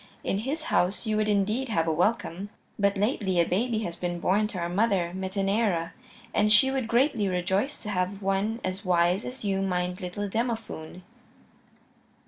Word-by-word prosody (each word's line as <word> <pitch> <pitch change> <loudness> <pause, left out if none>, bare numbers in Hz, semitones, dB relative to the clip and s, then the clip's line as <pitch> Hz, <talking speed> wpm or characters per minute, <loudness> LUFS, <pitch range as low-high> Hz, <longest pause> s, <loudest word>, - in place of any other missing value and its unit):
In 195 - 0
his 285 +8 -3
house 185 +6 +2
you 215 -1 0
would 215 0 +1
indeed 215 +5 +1
have 165 -7 +1
a 160 - +2
welcome. 190 +1 0 0.3
But 200 0 +2
lately 200 -4 +1
a 170 - +5
baby 220 +5 0
has 170 -4 -4
been 175 0 -3
born 200 +4 +2
to 210 - -6
our 170 -1 -1
mother, 185 -2 +1
Metaneira, 195 -2 0 0.4
and 210 0 +3
she 240 +6 +6
would 265 -4 -1
greatly 235 -3 +2
rejoice 190 +9 -1
to 210 - -4
have 185 +1 -1
one 200 +3 0
as 185 +2 -3
wise 180 +1 +2
as 250 -3 -7
you 195 -1 0
mind 180 0 -1
little 185 +3 -4
Demophoon." 220 -6 -4
200 Hz, 170 wpm, -27 LUFS, 180-220 Hz, 0.4 s, she